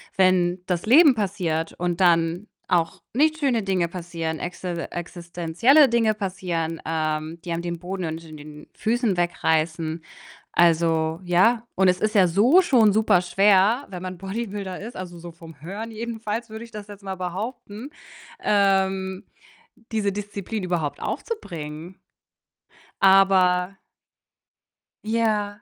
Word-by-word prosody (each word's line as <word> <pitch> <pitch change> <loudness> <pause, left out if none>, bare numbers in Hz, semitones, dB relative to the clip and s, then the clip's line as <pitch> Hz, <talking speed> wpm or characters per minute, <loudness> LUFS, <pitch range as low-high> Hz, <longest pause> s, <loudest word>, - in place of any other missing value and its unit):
Wenn 185 -1 +2
das 180 0 -1
Leben 280 +2 +7
passiert 180 -6 -2
und 175 0 -3
dann 170 +2 +2 0.2
auch 165 -2 0
nicht 310 +5 +2
schöne 255 -7 +1
Dinge 185 -3 0
passieren, 165 -2 -5
exi 180 +2 -6 0.2
existenzielle 175 - +2
Dinge 230 -2 +2
passieren, 180 -5 -3
ähm, 155 0 -2
die 175 - -6
einem 170 - -2
den 170 -1 -4
Boden 185 +1 -5
unter 160 0 -6
den 150 0 -11
Füßen 225 -4 0
wegreißen. 160 -1 0 0.5
Also 165 -1 +2
ja, 220 +7 +3
und 190 0 +3
es 180 - +1
ist 215 0 -1
ja 185 -3 +6
so 235 - +5
schon 235 - +4
super 215 -4 +3
schwer, 195 +7 +3
wenn 180 -2 -7
man 185 -1 -6
Bodybuilder 195 -1 -5
ist, 225 +4 -8
also 175 -2 -7
so 170 0 -9
vom 165 -3 -14
Hören 205 +7 -6
jedenfalls 225 0 -5
würde 220 +1 -8
ich 230 - -17
das 210 -1 -8
jetzt 205 -1 -12
mal 190 -1 -4
behaupten, 205 +6 -6 0.5
ähm, 190 -2 +1 0.7
diese 210 -3 0
Disziplin 205 0 -5
überhaupt 160 -6 -2
aufzubringen. 170 - -6 1.1
Aber 190 -1 +4 1.3
Ja. 215 -2 -1
185 Hz, 130 wpm, -23 LUFS, 170-215 Hz, 1.3 s, Leben